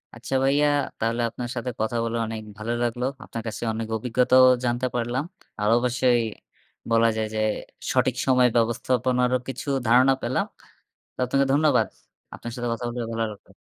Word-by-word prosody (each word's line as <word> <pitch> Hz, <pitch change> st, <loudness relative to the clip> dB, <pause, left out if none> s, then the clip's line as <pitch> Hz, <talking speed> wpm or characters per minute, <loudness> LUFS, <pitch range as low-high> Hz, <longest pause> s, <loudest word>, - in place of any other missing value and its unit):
আচ্ছা 135 Hz, -, -4 dB
ভাইয়া 145 Hz, +2 st, +3 dB, 0.3 s
তাহলে 115 Hz, +2 st, 0 dB
আপনার 120 Hz, +1 st, -6 dB
সাথে 120 Hz, +1 st, -3 dB
কথা 110 Hz, +2 st, -1 dB
বলে 115 Hz, 0 st, -2 dB
অনেক 110 Hz, 0 st, -5 dB, 0.2 s
ভালো 115 Hz, +2 st, -3 dB
লাগলো। 120 Hz, +1 st, -1 dB, 0.2 s
আপনার 115 Hz, -, -6 dB
কাছে 115 Hz, -, -5 dB
অনেক 110 Hz, 0 st, -4 dB
অভিজ্ঞতাও 125 Hz, +2 st, +4 dB, 0.2 s
জানতে 120 Hz, +1 st, 0 dB
পারলাম। 120 Hz, +3 st, -1 dB, 0.4 s
আর 105 Hz, -, 0 dB
অবশ্যই, 125 Hz, 0 st, +2 dB, 0.7 s
বলা 115 Hz, 0 st, +5 dB
যায় 110 Hz, -1 st, 0 dB
যে, 110 Hz, -, 0 dB, 0.5 s
সঠিক 130 Hz, -1 st, +2 dB
সময় 125 Hz, -2 st, +5 dB
ব্যবস্থাপনারও 125 Hz, +2 st, +1 dB
কিছু 135 Hz, +2 st, -6 dB, 0.2 s
ধারণা 130 Hz, +3 st, +6 dB
পেলাম। 120 Hz, +2 st, 0 dB, 0.7 s
তো -, -, -55 dB
আপনাকে 135 Hz, +2 st, +1 dB
ধন্যবাদ। 150 Hz, +1 st, +3 dB, 0.5 s
আপনার 120 Hz, -, -7 dB
সাথে 120 Hz, -1 st, -3 dB
কথা 115 Hz, +1 st, -4 dB
বলেও 120 Hz, -1 st, -4 dB
ভালো 115 Hz, 0 st, -1 dB
লাগলো। 105 Hz, -, -17 dB
120 Hz, 160 wpm, -25 LUFS, 115-130 Hz, 0.7 s, ধারণা